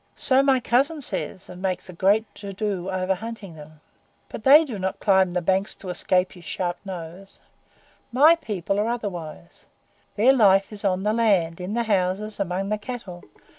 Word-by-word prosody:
"So 265 0 +3
my 270 -2 +3
cousin 275 +7 +1
says, 190 -7 -4
and 180 0 -11
makes 190 -1 -2
a 185 - -10
great 200 +5 +2
to 200 -1 -8
do 195 -2 -3
over 185 0 0
hunting 215 -2 -8
them, 155 0 -14 0.5
but 220 - -8
they 295 +4 +7
do 235 -8 -6
not 190 0 -3
climb 190 -3 +3
the 180 -1 -1
banks 190 +4 0
to 190 - -10
escape 180 +1 +2
his 180 - -14
sharp 175 +2 -3
nose. 185 0 -9 0.7
MY 290 +7 +6
people 200 - -3
are 210 - 0
otherwise. 180 -9 -6 0.5
Their 240 +6 +5
life 195 -4 +4
is 205 - -9
on 190 -1 0
the 210 +1 +1
land, 190 -7 +1
in 190 +4 -4
the 235 - +1
houses, 205 0 -1
among 195 +1 -2
the 215 0 -1
cattle. 210 -7 -8
195 Hz, 180 wpm, -24 LUFS, 180-220 Hz, 0.7 s, they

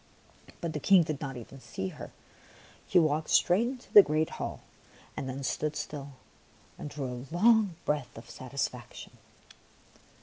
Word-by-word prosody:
But 170 -2 -3
the 150 - -2
King 185 +3 +6
did 155 -3 -4
not 135 -3 -4
even 125 +3 -10
see 95 -6 -5
her; - - -9 0.8
he - - +3
walked 155 -2 +2
straight 195 +7 +4
into 255 0 -8
the 205 - +12
great 155 -2 0
hall - - -4 0.5
and 130 - -4
then 135 +1 -5
stood 150 +3 -1
still 140 -2 -6 0.7
and - - -5
drew 145 -1 -5
a 125 +2 -7
long 215 -1 +4
breath 150 -4 -2
of - - -11
satisfaction. - - -5
150 Hz, 155 wpm, -30 LUFS, 135-175 Hz, 0.8 s, the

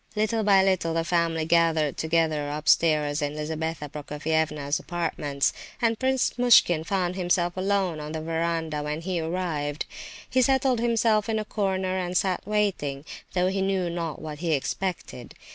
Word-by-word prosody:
Little 220 +1 +1
by 195 -2 +5
little 185 -4 +1
the 165 - +1
family 165 -2 0
gathered 165 -3 +2
together 160 -2 0
upstairs 150 0 +2
in 145 0 -2
Lizabetha 160 0 -3
Prokofievna's 150 0 -2
apartments, 155 -5 -1 0.3
and 230 -2 +1
Prince 260 -1 0
Muishkin 200 -9 +5
found 180 0 -1
himself 175 -1 0
alone 190 -3 0
on 150 0 -6
the 160 - -3
verandah 165 -1 -2
when 150 +2 -3
he 180 0 -2
arrived. 160 -4 -2 0.4
He 260 - +2
settled 265 -1 +2
himself 225 -2 +2
in 220 - +1
a 215 - -2
corner 190 -3 -1
and 180 0 -1
sat 185 -2 0
waiting, 190 -10 -1 0.3
though 180 0 +2
he 195 0 -1
knew 190 -2 0
not 170 -3 -4
what 155 -2 -7
he 165 -1 0
expected. 150 -4 -4
170 Hz, 155 wpm, -26 LUFS, 155-195 Hz, 0.4 s, by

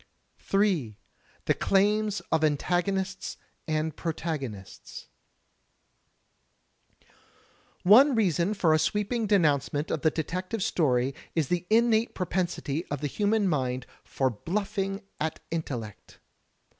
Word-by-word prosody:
J. 180 - +1 0.5
The - - +3
Claims 210 +1 +1
of 160 -1 +2
Antagonists 185 +6 -1 0.3
and 155 -1 -1
Protagonists 150 - -5 2.7
One 250 +9 +7
reason 190 -2 +1
for 170 -5 +3
a 155 - +3
sweeping 210 +6 0
denoimcement 150 -6 +1
of 155 - -1
the 160 - +4
detective 185 +7 -3
story 135 - +1 0.2
is 160 -5 0
the 180 0 -1
innate 225 0 +3
propensity 175 -4 -2
of 145 -1 -4
the - - -2
human 205 +6 +1
mind 130 -6 -1 0.2
for 130 -1 -1
bluffing 195 - -3 0.2
at 160 0 -2
intellect. 125 -10 -5
175 Hz, 105 wpm, -27 LUFS, 150-200 Hz, 2.7 s, One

